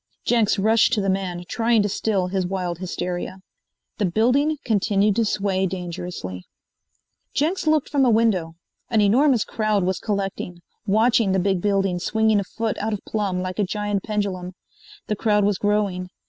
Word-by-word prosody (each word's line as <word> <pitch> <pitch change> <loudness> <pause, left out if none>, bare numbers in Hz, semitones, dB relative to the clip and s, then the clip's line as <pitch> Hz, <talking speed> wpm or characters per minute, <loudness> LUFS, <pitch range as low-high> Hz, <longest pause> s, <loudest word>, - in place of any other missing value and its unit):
Jenks 230 -3 +2
rushed 220 +4 +3
to 215 - +2
the 195 -1 +1
man, 185 -2 -3
trying 230 -2 +2
to - - +1
still 200 -2 0
his 185 0 -1
wild 180 -2 -3
hysteria. 180 0 -4 0.6
The 205 - +2
building 255 - +2
continued 205 -2 +2
to 230 - +3
sway 195 -2 0
dangerously. 175 - -6 0.9
Jenks 325 +4 0
looked 310 -2 +2
from 280 -2 +2
a 255 - +4
window. 210 -8 +2 0.3
An 225 - +2
enormous 235 +4 +4
crowd 215 -3 0
was 185 0 -1
collecting, 195 -4 -3 0.3
watching 220 0 +3
the 190 - +2
big 190 -1 0
building 195 -3 +1
swinging 220 +2 +2
a - - -1
foot 225 +3 -3
out 220 +1 -1
of 205 - -5
plumb 195 -4 -1
like 185 +2 -5
a - - +3
giant 205 0 -2
pendulum. 195 -4 -3 0.5
The 210 - -1
crowd 210 -1 +2
was 205 -2 +1
growing. 205 -3 0
205 Hz, 165 wpm, -23 LUFS, 185-220 Hz, 0.9 s, a